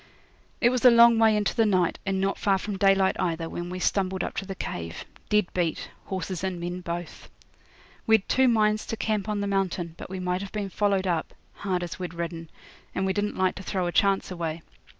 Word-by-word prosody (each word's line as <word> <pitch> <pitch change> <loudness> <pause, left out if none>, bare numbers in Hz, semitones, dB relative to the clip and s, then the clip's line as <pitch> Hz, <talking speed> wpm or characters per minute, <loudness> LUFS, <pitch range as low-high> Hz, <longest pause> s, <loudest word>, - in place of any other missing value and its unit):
It 240 - +5
was 255 -1 -1
a 250 - +10
long 235 -1 +7
way 220 -1 +5
into 205 -1 0
the 225 - +3
night, 185 -4 +1
and 195 -1 0
not 195 +1 0
far 195 -2 +2
from 205 +1 -4
daylight 195 -1 +3
either, 165 -2 -1
when 175 +1 -5
we 180 - -5
stumbled 185 0 0
up - - -4
to 195 - -3
the 195 - -5
cave 85 - -5 0.2
dead 210 -3 +2
beat, 170 -3 -1
horses 185 -1 -4
and 190 -2 -2
men 175 +1 -4
both. 170 -1 -6 0.8
We'd 220 -3 +4
two 260 0 +4
minds 215 -2 +2
to 225 - -3
camp 215 -1 -1
on 210 -1 -1
the - - -1
mountain, 190 -4 -1
but - - -8
we 190 0 -5
might 180 0 -1
have 200 - -7
been 205 -2 -3
followed 200 -2 +1
up, 170 -3 -1 0.2
hard 185 -3 -2
as 175 +1 -6
we'd 180 -2 -5
ridden, 165 -1 -5 0.5
and 190 - 0
we 190 - +1
didn't 205 +1 -2
like 185 0 +2
to - - -6
throw 185 -1 -1
a 175 - -1
chance 195 +1 +2
away. 165 -2 -4
190 Hz, 220 wpm, -26 LUFS, 175-205 Hz, 0.8 s, a